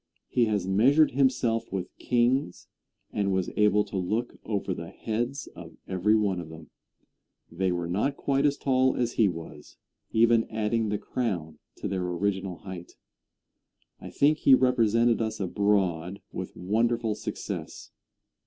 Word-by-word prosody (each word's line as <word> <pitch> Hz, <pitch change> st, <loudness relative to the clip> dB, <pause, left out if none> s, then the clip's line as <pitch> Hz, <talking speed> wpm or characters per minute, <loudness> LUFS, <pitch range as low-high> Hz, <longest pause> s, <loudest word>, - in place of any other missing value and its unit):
He 120 Hz, -, +3 dB
has 105 Hz, -4 st, -1 dB
measured 135 Hz, +11 st, +4 dB
himself 125 Hz, -3 st, +1 dB
with 95 Hz, -2 st, -4 dB
kings, 120 Hz, -3 st, 0 dB, 0.5 s
and 100 Hz, -2 st, 0 dB
was 95 Hz, -1 st, -1 dB
able 105 Hz, 0 st, +4 dB
to 100 Hz, -1 st, -5 dB
look 110 Hz, +7 st, -2 dB
over 100 Hz, -3 st, -2 dB
the 85 Hz, -1 st, -7 dB
heads 120 Hz, +5 st, -3 dB
of -, -, -11 dB
every 95 Hz, +3 st, +2 dB
one 100 Hz, -4 st, +1 dB
of 85 Hz, -2 st, -7 dB
them. 80 Hz, -1 st, -12 dB, 0.8 s
They 95 Hz, +2 st, 0 dB
were 85 Hz, -1 st, -2 dB
not 105 Hz, +11 st, -1 dB
quite 140 Hz, -1 st, 0 dB
as 140 Hz, 0 st, 0 dB
tall 130 Hz, -1 st, +2 dB
as 120 Hz, -1 st, 0 dB
he 110 Hz, -, +3 dB
was, 80 Hz, -4 st, -8 dB, 0.3 s
even 115 Hz, 0 st, +3 dB
adding 110 Hz, 0 st, 0 dB
the 105 Hz, -, 0 dB
crown 85 Hz, -11 st, -3 dB, 0.2 s
to -, -, -5 dB
their 95 Hz, -1 st, -2 dB
original 95 Hz, +1 st, -2 dB
height. 90 Hz, +1 st, -9 dB, 1.1 s
I -, -, -9 dB
think 150 Hz, +2 st, +2 dB
he 135 Hz, -, +7 dB
represented 115 Hz, -2 st, +3 dB
us 110 Hz, -1 st, -2 dB
abroad 95 Hz, -2 st, 0 dB
with -, -, -6 dB
wonderful 115 Hz, +4 st, 0 dB
success. -, -, -6 dB
105 Hz, 145 wpm, -27 LUFS, 95-120 Hz, 1.1 s, he